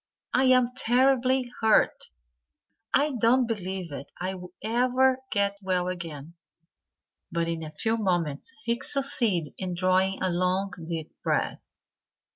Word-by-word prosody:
I'm 255 -1 +4
terribly 255 0 +2
hurt. 220 -1 +3 0.9
I 295 +2 +3
don't 245 +3 +4
believe 190 -6 -4 0.3
I'll 180 -1 -5
ever 255 +3 +2
get 200 -1 +1
well 185 -2 0
again." 165 -4 -6 1.0
But 170 -1 0
in 165 -1 -2
a 155 -1 -6
few 225 0 0
moments 175 -8 -1
he 235 +1 -1
succeeded 235 - 0
in 185 -2 -3
drawing 185 +1 +2
a 185 - 0
long, 185 +2 0 0.2
deep 160 -2 -4
breath. - - 0
195 Hz, 115 wpm, -27 LUFS, 180-245 Hz, 1.0 s, I'm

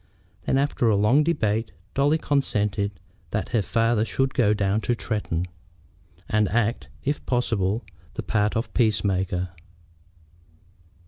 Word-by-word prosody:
Then, - - +2
after 135 -4 +2
a 105 - +4
long 110 +9 +4
debate, 110 - 0 0.2
Dolly 145 +3 +3
consented 105 - 0 0.3
that 105 - -2
her 115 -3 +2
father 115 +2 +2
should 135 +3 0
go 110 -4 +3
down 100 0 +1
to 120 - 0
Tretton, 105 -7 -2 0.8
and 105 -2 +2
act, 115 +1 0
if 145 +2 -1
possible, 110 -4 0 0.3
the - - -3
part 105 -1 +1
of 115 - -3
peace 110 -3 +2
maker. 95 -2 0
110 Hz, 130 wpm, -25 LUFS, 100-125 Hz, 0.8 s, a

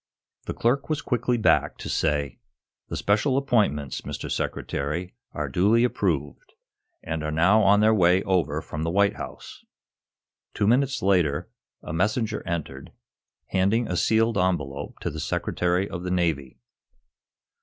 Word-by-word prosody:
The - - -3
clerk 125 +6 0
was 155 -2 0
quickly 125 -1 0
back, 110 - +2
to - - -7
say: 70 -2 -1 0.5
"The - - -4
special 130 +7 +1
appointments, 100 - 0
Mr. - - -6
Secretary, 80 +6 -3 0.2
are 75 -1 -3
duly 100 - +3
approved, 80 - -2 0.5
and 80 -1 -3
are 75 - -2
now 85 +8 +4
on 100 0 +5
their 110 +1 +5
way 90 -2 +4
over 85 -6 0
from 75 - -6
the 80 - -1
White 100 +3 +2
House." - - -9 0.9
Two - - +1
minutes 130 +3 +2
later, 90 -7 +1 0.3
a - - -6
messenger 105 +4 0
entered, 75 -6 -5 0.6
handing 105 +5 +1
a 90 - -2
sealed 110 +2 +2
envelope 75 -7 -2
to - - -2
the - - -6
Secretary 90 +2 -1
of 85 - -6
the 90 - -4
Navy. 80 -8 -1
90 Hz, 145 wpm, -25 LUFS, 75-110 Hz, 0.9 s, on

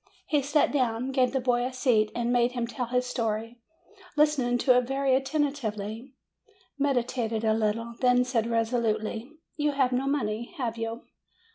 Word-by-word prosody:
He 295 -2 +1
sat 285 +2 +2
down, 255 -2 0
gave 255 -2 +2
the 265 - 0
boy 245 -1 +1
a 255 - -2
seat, 245 -4 +2
and 240 0 0
made 245 0 +2
him 240 -2 -1
tell 245 +1 -4
his 250 +1 0
story, 230 -1 -3 0.6
listening 285 -5 +3
to 255 0 +4
it 250 0 +3
very 270 0 +1
attentively, 265 -4 -2 0.6
meditated 245 -5 0
a 220 -1 +3
little, 225 +2 -1
then 250 -1 +4
said 240 -3 0
resolutely, 230 0 -1 0.3
"You 295 -1 +1
have 265 -2 +2
no 255 +2 0
money, 235 -1 -2
have 240 -5 -2
you 230 0 -4
245 Hz, 160 wpm, -27 LUFS, 230-265 Hz, 0.6 s, to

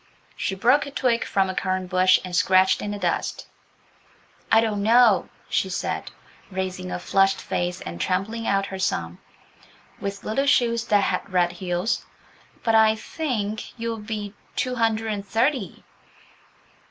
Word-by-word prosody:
She 195 - -2
broke 250 +9 +3
a - - -5
twig 250 -4 +1
from 195 -1 +1
a 190 - -3
currant 185 -1 -2
bush 185 0 +5
and 180 -1 -5
scratched 185 +1 +4
in 205 - -3
the 205 - -3
dust. 180 -4 -2 1.1
"I 225 - +7
don't 215 -3 0
know," 225 -1 +5 0.2
she 190 - 0
said, 180 - -3 0.4
raising 185 -1 -4
a - - -2
flushed 195 +2 +2
face, 175 0 -3
and 85 0 -6
trampling 210 +5 -1
out 195 0 +2
her 190 -1 -7
"sum" 85 - -2 0.8
with 200 0 -5
little 270 +6 0
shoes 235 -4 +3
that 205 -2 +3
had 200 - -2
red 175 -1 +2
heels, 180 +3 -2 0.6
"but 225 - +2
I 220 0 +5
think 220 -4 -4
you'll 230 0 -2
be 210 -1 -5 0.2
two 255 -2 -1
hundred 225 -2 0
and 200 -1 -4
thirty." 240 +7 -1
200 Hz, 155 wpm, -24 LUFS, 185-225 Hz, 1.1 s, I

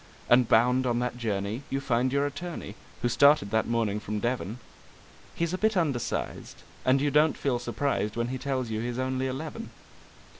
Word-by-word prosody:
And 120 -1 +5
bound 125 +3 +4
on 120 -1 +1
that 125 0 -1
journey 105 +1 -2
you 135 - -1
find 125 -1 +1
your 140 +1 +2
attorney 145 - -5 0.3
(who - - +3
started 140 -4 +4
that 110 0 +1
morning 115 -3 0
from 105 0 -4
Devon); 120 -3 -2 0.8
He's 170 +1 -1
a 185 - -2
bit 215 -2 +2
undersized, 140 -9 -2 0.2
and 130 +1 +4
you 145 +1 +1
don't 150 +2 +4
feel 130 -4 0
surprised 120 -3 -1
when 120 +1 -1
he 130 0 -3
tells 130 -3 -2
you 110 - -1
he's 120 +1 -3
only 130 0 -1
eleven. 155 - -5
125 Hz, 180 wpm, -28 LUFS, 115-140 Hz, 0.8 s, And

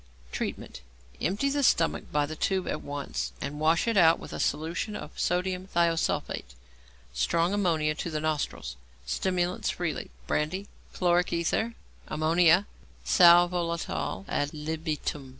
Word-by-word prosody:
Treatment. - - -5 0.4
Empty 205 +10 +1
the 285 0 0
stomach 170 -10 +2
by 150 -1 +2
the 155 +2 -6
tube 190 +3 0
at 150 - -2
once, 145 0 -4
and 145 +1 -5
wash 160 +6 +2
it 230 - +1
out 165 -3 +6
with - - -9
a - - -5
solution 170 +7 -1
of 150 - -7
sodium 180 +1 -1
thiosulphate. 165 - 0 0.6
Strong 165 - +1
ammonia 165 -7 +1
to 160 - -4
the 155 -1 -2
nostrils. 150 - -2 0.3
Stimulants 180 - -1
freely 170 -5 -3 0.2
brandy, 165 - -1 0.3
chloric 175 0 +2
ether, 195 +7 0 0.3
ammonia, 170 +4 +4 0.4
sal 175 -1 +7
volatile 170 - -3
ad 145 +1 -1
libitum. 150 -2 -3
165 Hz, 135 wpm, -28 LUFS, 150-180 Hz, 0.6 s, sal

